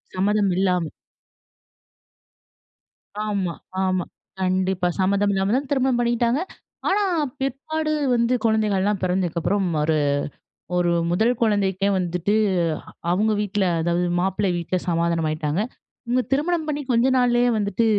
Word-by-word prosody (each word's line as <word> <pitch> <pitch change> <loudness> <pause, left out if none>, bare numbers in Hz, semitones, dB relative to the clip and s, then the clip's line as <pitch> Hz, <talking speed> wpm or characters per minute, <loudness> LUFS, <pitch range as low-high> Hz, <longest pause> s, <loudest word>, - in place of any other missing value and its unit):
சம்மதம் 200 +1 +2
இல்லாம. 180 -3 +1 2.4
ஆமா, 195 -5 -1 0.3
ஆமா, 185 -2 0 0.4
கண்டிப்பா. 185 -1 +1
சம்மதம் 200 +2 +2
இல்லாம 195 +2 0
தான் 275 0 -2
திருமணம் 265 -3 +2
பண்ணிக்கிட்டாங்க. 240 +3 +1 0.5
ஆனா 405 +2 +2 0.4
பிற்பாடு 310 +4 -2 0.2
வந்து 235 +1 +2
குழந்தைகள் 215 -3 +2
எல்லாம் 205 -1 0
பிறந்ததுக்கு 180 -2 0
அப்புறம், 195 +3 0 0.2
ஒரு 155 +1 +2 0.8
ஒரு 175 -1 +2 0.2
1 220 +7 +3
குழந்தைக்கே 200 -3 +1
வந்துட்டு, 180 +3 0 0.8
அவுங்க 210 +5 +2
வீட்ல 205 -1 0 0.2
அதாவது 175 +1 +1
மாப்பிள்ளை 190 +1 0
வீட்ல 175 +2 -1
சமாதானம் 170 -1 +1
ஆயிட்டாங்க. 155 +3 -1 0.4
இவுங்க 245 +2 +1
திருமணம் 315 +3 +1
பண்ணி 295 -1 -2
கொஞ்ச 235 +1 +3
நாள்லயே 245 -1 +3
வந்துட்டு, 210 +2 0
200 Hz, 115 wpm, -23 LUFS, 180-240 Hz, 2.4 s, 1